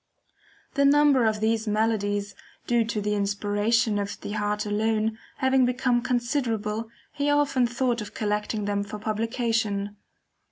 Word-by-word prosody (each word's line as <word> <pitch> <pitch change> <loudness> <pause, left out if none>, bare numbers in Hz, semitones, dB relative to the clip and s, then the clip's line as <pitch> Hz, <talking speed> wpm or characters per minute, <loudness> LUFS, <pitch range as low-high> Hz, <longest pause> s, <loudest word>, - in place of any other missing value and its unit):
The 280 - +2
number 280 -4 +5
of 215 -1 0
these 220 0 +1
melodies, 205 -2 0 0.3
due 240 -1 +2
to 220 -1 -2
the 210 +1 -1
inspiration 205 +2 +1
of 200 0 -4
the - - -6
heart 210 0 -1
alone, 220 +1 0 0.2
having 265 0 +3
become 250 -1 +1
considerable, 235 -3 -1 0.2
he 285 +1 0
often 290 -4 +2
thought 240 -1 -1
of 210 - -8
collecting 210 0 -1
them 205 0 0
for 205 +1 -7
publication. 215 -1 -1
220 Hz, 135 wpm, -26 LUFS, 210-245 Hz, 0.3 s, number